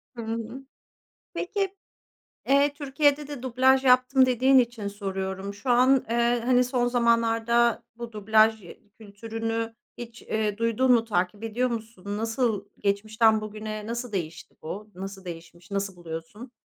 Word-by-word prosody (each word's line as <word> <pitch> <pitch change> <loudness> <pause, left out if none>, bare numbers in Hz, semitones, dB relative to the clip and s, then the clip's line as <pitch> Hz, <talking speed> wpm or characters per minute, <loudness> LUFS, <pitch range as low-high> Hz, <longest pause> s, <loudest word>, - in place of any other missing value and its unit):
Hı 235 - -6
hı. 230 +3 -5 0.7
Peki, 390 +1 -2 0.7
eee, 280 +1 +4
Türkiye'de 290 0 +1
de 290 -4 -7
dublaj 260 +1 +3
yaptım 255 +1 +5
dediğin 255 +2 +4
için 235 -4 -1
soruyorum. 195 -1 -4
Şu 205 +6 -6
an, 255 +2 +4
eee, 235 +1 +2
hani, 250 0 +4
son 250 -1 0
zamanlarda 235 -1 +2
bu 235 0 -7
dublaj 220 0 +3 0.4
kültürünü 225 +2 -4 0.2
hiç, 235 -1 -9
eee, 215 -2 -2
duydun 230 +3 +2
mu, 235 -2 +5
takip 195 0 -1
ediyor 240 +3 0
musun? 220 -3 -5
Nasıl 225 -2 -1
geçmişten 215 +2 +2
bugüne 215 0 -6
nasıl 235 +1 -4
değişti 170 -5 -5
bu? 210 +6 -7
Nasıl 195 +1 -8
değişmiş? 170 +2 -10
Nasıl 200 -1 -2
buluyorsun? 175 +8 -8
225 Hz, 135 wpm, -26 LUFS, 205-250 Hz, 0.7 s, yaptım